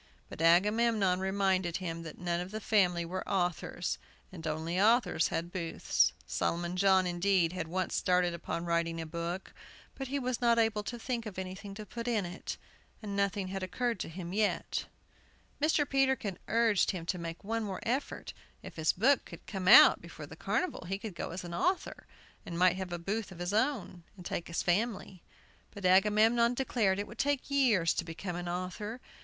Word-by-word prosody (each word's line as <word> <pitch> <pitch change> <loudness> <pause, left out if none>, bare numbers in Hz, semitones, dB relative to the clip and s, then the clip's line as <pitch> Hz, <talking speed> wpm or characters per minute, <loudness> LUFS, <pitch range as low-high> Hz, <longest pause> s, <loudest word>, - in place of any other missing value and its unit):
But - - -8
Agamemnon 195 +2 +4
reminded 190 -2 +1
him 165 -3 -4
that 165 -2 -9
none 175 -1 -1
of 180 +1 -5
the 215 +2 -5
family 180 -6 +2
were 185 +3 -4
authors, 175 -6 -1 0.3
and 165 -3 -7
only 160 +4 -1
authors 225 -6 +4
had 170 +1 -3
booths. 170 -3 +1
Solomon 175 +1 -1
John, 190 0 +4
indeed, 175 -1 +2
had 185 -3 -3
once 185 +2 -2
started 180 -1 +2
upon 170 0 -4
writing 170 -1 0
a 165 - -4
book, 170 +3 -5 0.4
but 270 - -6
he 280 +3 -2
was 255 -3 -2
not 235 -1 +4
able 225 -2 +2
to 240 - -4
think 235 -1 -3
of 200 - -8
anything 190 +2 -6
to 215 +1 -7
put 235 +4 -6
in 220 -5 +1
it, 175 +1 -6 0.5
and 200 -1 -4
nothing 200 -1 0
had 195 0 -4
occurred 230 +3 -2
to - - -4
him 175 +1 -7
yet. 210 0 0 0.8
Mr. 300 -1 +3
Peterkin 265 -8 +1
urged 225 -3 +3
him 175 -3 -3
to 180 +1 -2
make 165 0 -6
one 225 +2 -2
more 195 -3 -4
effort. 255 +5 -3 0.3
If - - -10
his 160 -1 +2
book 260 +8 +3
could - - -11
come 190 -3 -4
out - - +9
before - - -9
the - - -11
carnival 365 - -2
he 195 +2 -2
could 205 -1 -7
go - - -5
as 180 +2 -6
an 175 -1 -7
author, 365 - -1 0.4
and 170 - -6
might 180 0 +4
have 190 -2 -5
a 175 - -2
booth 200 +4 -3
of 180 - -10
his 175 +3 -3
own, 215 -7 0
and 180 - -11
take 170 - -3
his 170 - -2
family. 195 -1 -1 0.5
But 200 -2 -8
Agamemnon 215 +5 +4
declared 230 -7 +1
it 205 - -2
would - - -13
take 285 0 0
years 235 -12 +3
to - - -2
become 170 +2 -6
an 175 0 -4
author. 185 +6 -4
190 Hz, 190 wpm, -31 LUFS, 175-220 Hz, 0.8 s, out